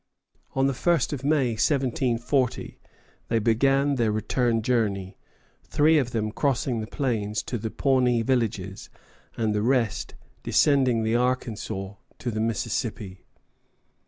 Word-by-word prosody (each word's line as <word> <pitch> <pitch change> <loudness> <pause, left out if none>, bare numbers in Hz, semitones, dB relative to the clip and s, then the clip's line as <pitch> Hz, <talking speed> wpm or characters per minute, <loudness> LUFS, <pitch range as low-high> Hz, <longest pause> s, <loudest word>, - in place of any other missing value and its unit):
On 135 0 +2
the 135 - +2
1st 170 +3 +1
of 135 -2 -5
May, 140 -3 +2
1740, 130 0 0 0.5
they 115 - +1
began 135 +5 +2
their 115 -3 +2
return 115 +2 0
journey, 100 -6 0 0.5
three 155 +1 +3
of 130 -4 -1
them 110 -3 -2
crossing 130 -2 0
the 110 - -5
plains 110 -6 -2
to 120 - -4
the 110 +1 -3
Pawnee 125 -2 +2
villages, 105 -6 -2 0.5
and 110 -2 0
the 105 - 0
rest 120 -2 0 0.3
descending 130 -6 +3
the 110 +1 +1
Arkansas 110 -5 -2 0.2
to 120 - -3
the 110 0 -2
Mississippi. 110 -3 -3
120 Hz, 130 wpm, -25 LUFS, 110-135 Hz, 0.5 s, three